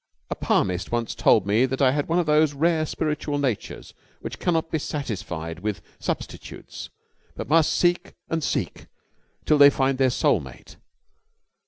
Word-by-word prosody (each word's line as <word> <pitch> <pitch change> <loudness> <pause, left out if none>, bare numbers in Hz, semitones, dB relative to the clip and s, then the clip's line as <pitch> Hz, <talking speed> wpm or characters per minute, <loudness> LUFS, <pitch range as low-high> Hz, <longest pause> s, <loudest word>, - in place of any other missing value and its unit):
A - - 0
palmist 90 0 0
once 120 -1 -1
told 105 - +3
me 110 +6 +3
that 130 +1 -4
I 135 -3 +4
had 145 +1 -1
one 165 - +1
of 175 - +2
those 150 -1 +3
rare 160 +1 +1
spiritual 150 -2 -2
natures 130 -7 -3 0.3
which - - -7
cannot 165 -2 0
be 160 - 0
satisfied 95 - -5
with 105 +1 -4 0.2
substitutes - - -6 0.5
but - - -6
must 160 +1 +4
seek 175 +2 +1
and 165 -1 -2
seek - - -3 0.6
till 150 -1 +3
they 140 0 +10
find 135 -1 0
their 130 -1 +4
soul 125 - +2
mate. - - -12
145 Hz, 160 wpm, -24 LUFS, 115-155 Hz, 0.6 s, they